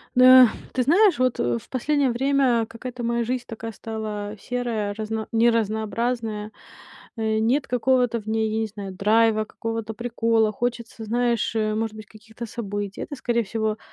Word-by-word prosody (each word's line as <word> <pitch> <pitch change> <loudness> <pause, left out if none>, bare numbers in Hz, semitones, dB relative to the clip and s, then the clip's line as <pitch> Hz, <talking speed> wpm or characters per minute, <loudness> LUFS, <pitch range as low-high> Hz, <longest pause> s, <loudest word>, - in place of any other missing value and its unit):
Да, 255 0 +9 0.3
ты 255 - +1
знаешь, 375 - +4
вот, 255 -1 +1
э, 120 -1 +1
в - - -13
последнее 275 0 +1
время 255 -2 +2
какая-то 245 +2 -7
моя 235 0 0
жизнь 245 +1 -2
такая 225 0 -6
стала 215 -1 -5
серая, 230 -4 -2
разна 220 +1 -4
неразнообразная. 225 -1 0 0.7
Э, 220 -1 0
нет 250 +6 +1
какого-то 250 -1 +2
в 210 - -19
ней, 220 0 0
я 220 - -1
не 220 - -1
знаю, 200 -2 -7
драйва, 215 +2 +3
какого-то 225 0 -5
прикола. 230 -1 +1
Хочется, 235 0 -4
знаешь, 235 0 0
э, 215 -1 +1
может 220 0 -2
быть, 215 0 -9
каких-то 220 +2 -10
событий. 205 -3 -5
Это, 285 - -5
скорее 240 -3 0
всего, 220 +1 -2
225 Hz, 160 wpm, -24 LUFS, 215-245 Hz, 0.7 s, Да